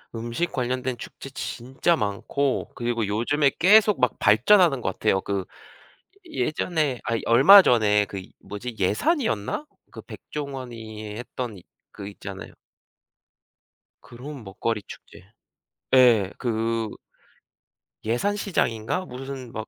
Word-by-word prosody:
음식 120 +9 -3
관련된 125 -1 -2
축제 135 - -10
진짜 135 +5 -1
많고 125 +5 -2
그리고 120 -2 -1
요즘에 135 +8 +1
계속 210 +2 +5
막 125 - +1
발전하는 135 - +4
것 95 - -2
같아요. 95 - +1
그 100 -2 -3 0.8
이 330 -4 -8
예전에 155 -5 -1
아니 115 -1 -1
얼마 140 +13 +8
전에 105 -6 +3
그 100 -1 -7 0.2
뭐지 115 +4 -7
예산이었나? 110 - 0 0.2
그 - - -10
백종원이 115 -7 -7
했던 120 -2 -6
이 90 - -15 0.3
그 100 - -8
있잖아요. 100 -1 -9 1.5
그런 130 +2 -10
먹거리 105 +2 -3
축제. 95 - -13 0.7
예. 115 -7 +5
그 115 -2 -1 1.2
예산 120 - 0
시장인가 180 - -1
무슨 130 -2 -8
막 110 0 -6
120 Hz, 240 characters per minute, -24 LUFS, 110-140 Hz, 1.5 s, 얼마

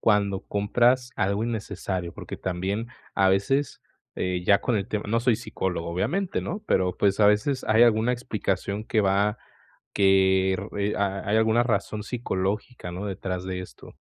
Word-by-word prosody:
cuando 100 -3 +2
compras 120 +5 +2
algo 100 +1 0
innecesario? 100 -6 -3
Porque, - - -8
también 95 +5 -3 0.3
a 95 - +4
veces, 120 +10 +1 0.4
eh, 90 -1 -1
ya 100 +2 +5
con 120 - 0
el 100 -2 -2
tema 105 -1 -2
no 115 +2 +1
soy 120 -2 +3
psicólogo, 95 -6 -3
obviamente, 175 - -1
¿no?, 210 - -5
pero 90 -1 +1
pues, 100 0 +2
a 105 - +7
veces 105 +6 +2
hay 110 +2 +4
alguna 115 +1 +4
explicación 105 -3 -2
que 110 - +1
va 100 +2 +2 0.5
que 95 -1 +4
r 95 +3 -5 0.2
eh - - -2
ha 100 0 -2
hay 105 - +3
alguna 110 +2 +3
razón 105 -2 -1
psicológica, 105 -2 -3
¿no?, 95 +4 -5
detrás 95 -1 -4
de 95 -1 -4
esto. 90 - -12
100 Hz, 165 wpm, -25 LUFS, 95-115 Hz, 0.5 s, a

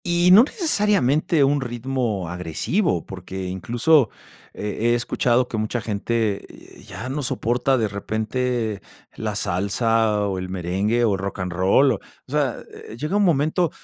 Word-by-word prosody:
Y 175 0 +3
no 205 +5 +9
necesariamente 205 - +2
un 140 +1 +2
ritmo 120 -5 -2
agresivo, 90 - -1
porque 95 0 -7
incluso 115 - +2 0.4
he 105 +3 -2
he - - +4
escuchado 120 +1 +1
que 115 - -4
mucha 110 +3 -1
gente, 110 -1 -1 0.4
eh, - - -15
ya 115 - -7
no 140 +3 -3
soporta 125 +1 0
de 110 -3 +1
repente 110 +1 -2 0.3
la - - -3
salsa 105 +2 +1
o 95 -2 -2
el 90 0 -5
merengue 95 +6 0
o 105 - +2
el 95 - -2
rocanrol 95 +6 +2
o - - -1
o - - -21
sea, - - 0 0.2
eh, 110 - -10
llega 150 +9 -2
un 205 - +3
momento, 165 0 +2
115 Hz, 150 wpm, -22 LUFS, 100-135 Hz, 0.4 s, no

